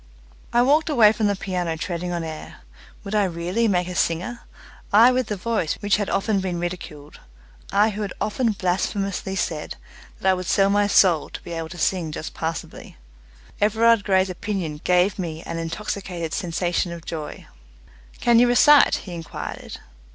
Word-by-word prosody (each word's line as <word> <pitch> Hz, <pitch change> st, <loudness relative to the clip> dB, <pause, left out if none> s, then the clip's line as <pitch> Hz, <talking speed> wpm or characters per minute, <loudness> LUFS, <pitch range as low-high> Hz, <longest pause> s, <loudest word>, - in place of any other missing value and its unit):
I 240 Hz, 0 st, +4 dB
walked 300 Hz, +5 st, +3 dB
away 230 Hz, -8 st, +6 dB
from 220 Hz, -1 st, 0 dB
the 200 Hz, -, +1 dB
piano 180 Hz, -4 st, -3 dB
treading 175 Hz, +1 st, -4 dB
on 170 Hz, -1 st, -2 dB
air. 160 Hz, -1 st, -8 dB, 0.4 s
Would 200 Hz, 0 st, -6 dB
I 210 Hz, -1 st, +3 dB
really 180 Hz, +6 st, -1 dB
make 180 Hz, -3 st, +1 dB
a 180 Hz, -, -5 dB
singer? 180 Hz, +8 st, -1 dB, 0.5 s
I 230 Hz, +5 st, +7 dB
with 255 Hz, -2 st, 0 dB
the 210 Hz, -, -2 dB
voice 200 Hz, -5 st, -1 dB
which 205 Hz, -1 st, +1 dB
had 205 Hz, -2 st, -2 dB
often 200 Hz, 0 st, +1 dB
been 185 Hz, -2 st, -3 dB
ridiculed; 170 Hz, -4 st, -6 dB, 0.5 s
I 210 Hz, +2 st, +3 dB
who 210 Hz, +1 st, -5 dB
had 205 Hz, -, -3 dB
often 225 Hz, +1 st, 0 dB
blasphemously 195 Hz, +1 st, -2 dB
said 160 Hz, -4 st, -3 dB, 0.4 s
that -, -, -2 dB
I 190 Hz, -, +6 dB
would 185 Hz, -1 st, -4 dB
sell 195 Hz, 0 st, +3 dB
my 205 Hz, 0 st, +3 dB
soul 180 Hz, -6 st, +4 dB
to -, -, -9 dB
be 175 Hz, -, -9 dB
able 165 Hz, -1 st, -4 dB
to 175 Hz, -, -9 dB
sing 170 Hz, -1 st, 0 dB
just 155 Hz, -, -6 dB
passably. 165 Hz, -, -6 dB, 0.6 s
Everard 220 Hz, +1 st, +4 dB
Grey's 190 Hz, -2 st, +2 dB
opinion 180 Hz, -6 st, -4 dB
gave 180 Hz, +2 st, +2 dB
me 165 Hz, -3 st, -4 dB
an 165 Hz, -, -5 dB
intoxicated 170 Hz, -1 st, -4 dB
sensation 175 Hz, 0 st, -1 dB
of 170 Hz, -1 st, -8 dB
joy. 155 Hz, -3 st, -6 dB, 0.7 s
"Can 235 Hz, -1 st, +4 dB
you 245 Hz, -, +5 dB
recite?" 285 Hz, +4 st, +6 dB
he 180 Hz, -, -7 dB
inquired. 165 Hz, -1 st, -7 dB
190 Hz, 175 wpm, -23 LUFS, 170-210 Hz, 0.7 s, I